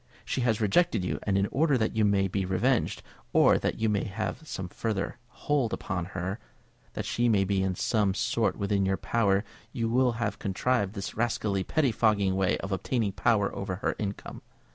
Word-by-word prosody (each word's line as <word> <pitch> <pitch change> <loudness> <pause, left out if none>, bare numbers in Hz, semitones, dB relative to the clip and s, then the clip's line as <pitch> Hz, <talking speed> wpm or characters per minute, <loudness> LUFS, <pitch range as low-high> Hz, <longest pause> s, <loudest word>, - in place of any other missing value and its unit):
She - - -1
has 115 -3 +1
rejected 110 - +2
you; - - -2
and 100 -1 +2
in 100 - +2
order 145 -1 +3
that 110 -2 -1
you 110 - +2
may 100 -1 +3
be 95 +1 -1
revenged, 110 +7 0 0.3
or - - +5
that - - -1
you 110 - +1
may 105 -2 +1
have 110 +10 -4
some 95 -9 -4
further 110 +4 -3
hold 135 -3 -1
upon 90 -2 -3
her, 95 +4 -3 0.5
that - - -4
she 120 0 +1
may 100 -3 +3
be 95 0 0
in 95 -1 0
some 100 -1 +1
sort 115 +2 0
within 100 -1 0
your 95 0 +1
power, 100 -4 +1 0.3
you 120 +1 +1
have 110 -3 -3
contrived 100 +1 0
this 100 - -4
rascally 105 -4 0
pettifogging 110 -8 +2
way 95 -1 +2
of 95 - -5
obtaining 105 +3 0
power 100 0 +1
over 95 -1 -3
her 95 - -2
income. 100 -1 -5
105 Hz, 185 wpm, -28 LUFS, 95-115 Hz, 0.5 s, or